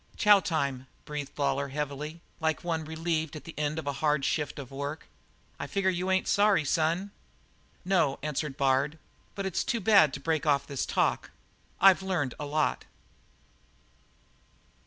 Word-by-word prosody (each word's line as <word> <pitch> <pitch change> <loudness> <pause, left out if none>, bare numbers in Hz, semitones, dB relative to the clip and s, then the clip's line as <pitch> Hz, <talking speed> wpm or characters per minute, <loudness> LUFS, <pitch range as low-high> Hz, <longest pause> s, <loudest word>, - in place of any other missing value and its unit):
"Chow 205 -2 +6
time," 140 -7 -2 0.2
breathed 150 -2 -6
Lawlor 140 -1 0
heavily, 150 +3 -5 0.2
like 160 -2 -1
one 165 -2 -1
relieved 160 0 -2
at 155 - -8
the 165 - -9
end 150 +1 -1
of 160 - -4
a 140 - -1
hard 150 -2 +2
shift 150 -1 -1
of 140 -3 -8
work. 140 +3 -5 0.5
"I - - -4
figure 195 -1 +1
you 180 +1 -2
ain't 190 0 +1
sorry, 200 -5 +3
son?" 170 +6 0 0.7
"No," 180 -7 +2
answered 150 -2 -3
Bard, 140 +3 +1 0.4
"but 195 - -3
it's 190 - -1
too 235 - -1
bad 200 -8 +5
to - - -6
break 160 +2 -1
off 140 -1 +3
this 140 -3 -3
talk. - - 0 0.5
I've 195 -1 +7
learned 175 -10 -1
a 145 - -4
lot." 155 +1 0
155 Hz, 155 wpm, -29 LUFS, 140-175 Hz, 0.7 s, I've